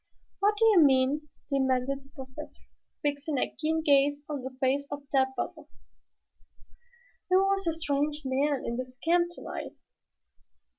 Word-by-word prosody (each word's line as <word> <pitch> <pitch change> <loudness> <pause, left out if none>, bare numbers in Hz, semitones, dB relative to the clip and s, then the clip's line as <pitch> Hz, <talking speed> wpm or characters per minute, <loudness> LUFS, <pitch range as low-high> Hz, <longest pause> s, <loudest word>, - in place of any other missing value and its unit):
"What 410 +2 +3
do 450 - +4
you 420 -6 +7
mean?" 275 +2 +3 0.2
demanded 265 0 +1
the 270 - -21
Professor, 280 +2 -9 0.4
fixing 290 0 -1
a - - -1
keen 320 +1 0
gaze 285 0 +3
on 290 -3 -4
the 260 0 -8
face 275 +2 +1
of 285 0 -5
Tad 265 -1 +4
Butler. 310 +2 -4 1.6
"There 370 - +5
was 390 -1 +2
a 330 - +2
strange 295 -1 -1
man 275 +1 +1
in 235 - -2
this 255 0 -6
camp 345 +5 +2
tonight." 345 - -7
285 Hz, 145 wpm, -29 LUFS, 265-320 Hz, 1.6 s, you